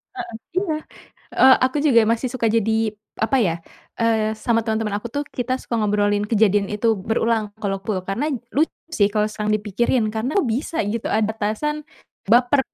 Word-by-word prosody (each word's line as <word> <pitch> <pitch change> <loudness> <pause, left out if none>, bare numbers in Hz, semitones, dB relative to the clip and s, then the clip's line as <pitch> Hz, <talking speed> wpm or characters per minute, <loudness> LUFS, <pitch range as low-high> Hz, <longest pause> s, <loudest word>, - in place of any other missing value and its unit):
Heeh, 360 -9 -6 0.2
iya. 370 -5 +1 0.6
Eee, 260 0 +7
aku 260 +3 0
juga 235 -5 +6
masih 240 +2 -1
suka 240 -3 -1
jadi, 220 0 +1 0.3
apa 245 +5 +1
ya, 175 -6 +2 0.5
eee, 220 -1 +2
sama 230 0 +1
temen-temen 220 -2 -1
aku 235 - -7
tuh 290 +1 -1
kita 245 +1 -1
suka 235 - -5
ngobrolin 205 -1 +1
kejadian 205 -2 +3
itu 210 +2 -2 0.2
berulang 225 0 +1 0.2
kalau 195 -1 -1
aku. 195 -1 -2
Karena 245 +11 -1 0.3
lucu 310 +4 +2 0.2
sih 205 -10 +3
kalau 210 -1 +2
sekarang 210 0 -2
dipikirin 215 +3 0
karena 245 - -2
kok 310 -11 +1
bisa 275 +8 -2
gitu 225 +2 -3
ada 215 0 +1
atasan 225 +8 -2 0.5
baper. 245 +5 +4
225 Hz, 170 wpm, -22 LUFS, 210-255 Hz, 0.6 s, Eee